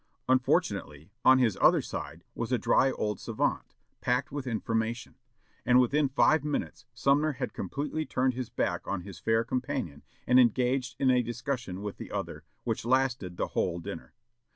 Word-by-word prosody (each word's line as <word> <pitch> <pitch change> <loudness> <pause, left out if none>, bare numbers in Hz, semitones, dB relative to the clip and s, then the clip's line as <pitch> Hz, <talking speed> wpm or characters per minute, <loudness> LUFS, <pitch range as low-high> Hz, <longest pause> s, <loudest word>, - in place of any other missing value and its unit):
Unfortunately, 100 - 0
on 130 0 +7
his 120 -6 +2
other - - +6
side - - -6
was - - -4
a - - +3
dry 135 - +3
old 105 -2 -2
savant, - - -2 0.2
packed 125 +4 0
with 140 -2 -5
information; 115 0 -2 0.5
and 125 0 +5
within 140 +3 +2
five 150 +3 +3
minutes 150 -1 -3
Sumner 145 +2 +2
had 125 - -4
completely 150 +2 -3
turned 130 -3 0
his 125 -1 -5
back - - -2
on 100 -2 -2
his 90 -2 -10
fair 115 +4 +2
companion 125 - -3 0.2
and 125 +1 +5
engaged 125 +1 +2
in 130 -2 +3
a 125 -1 +4
discussion 120 -5 -4
with 105 -1 -5
the - - -8
other, - - -4 0.2
which - - -2
lasted 120 -7 0
the - - -1
whole 85 -2 -1
dinner. 85 -1 -8
125 Hz, 165 wpm, -29 LUFS, 110-135 Hz, 0.5 s, on